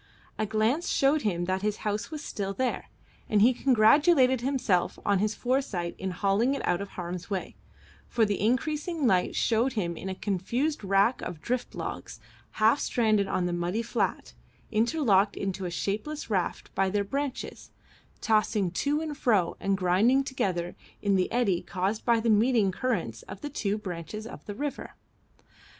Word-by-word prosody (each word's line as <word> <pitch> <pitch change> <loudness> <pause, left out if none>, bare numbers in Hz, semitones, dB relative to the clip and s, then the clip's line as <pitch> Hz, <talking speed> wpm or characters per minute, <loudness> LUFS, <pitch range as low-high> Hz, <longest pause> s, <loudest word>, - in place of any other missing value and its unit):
A 215 - 0
glance 220 - +1
showed 280 +2 +3
him 175 -6 -1
that 185 +1 -1
his 210 0 -1
house 210 0 -1
was 310 -1 -6
still 195 -2 -4
there, 260 -1 -2 0.4
and 210 - +3
he 235 +5 +6
congratulated 260 +2 +4
himself 245 -9 0
on 200 -2 +3
his 210 +1 0
foresight 240 -10 -1
in 190 - -2
hauling 200 +8 +1
it - - -4
out 175 - +1
of 200 - -6
harm's 180 +1 -5
way, 195 -3 -4 0.5
for 230 -2 +2
the 205 -3 -1
increasing 300 +7 0
light 185 -6 +2
showed 235 +3 +2
him 175 -7 -2
a 190 +2 -5
confused 215 - -1
wrack 200 +5 +2
of 160 - -6
drift 250 +7 -3
logs, - - -6 0.3
half 220 +6 +3
stranded 215 -4 +1
on 180 - 0
the 175 - -1
muddy 175 +6 -1
flat, 225 - -2 0.4
interlocked 220 -4 +2
into 195 -1 -3
a - - -2
shapeless 220 - -3
raft 185 -4 -2
by 195 0 +1
their 205 +1 0
branches, 275 +5 -4 0.5
tossing 215 -4 +1
to 290 - 0
and 310 -2 -4
fro 205 -8 +2
and 195 0 0
grinding 200 +9 +3
together 180 -10 -2 0.3
in 200 -1 +3
the 185 -1 +1
eddy 205 -8 +1
caused 190 +4 -2
by 235 -1 +3
the 230 - -2
meeting 220 -2 +3
currents 185 - -2
of 190 0 -8
the 295 - -4
two 210 -6 -1
branches 190 +1 -6
of - - -9
the 205 - -5
river. 290 +4 -5
215 Hz, 165 wpm, -28 LUFS, 190-250 Hz, 0.5 s, he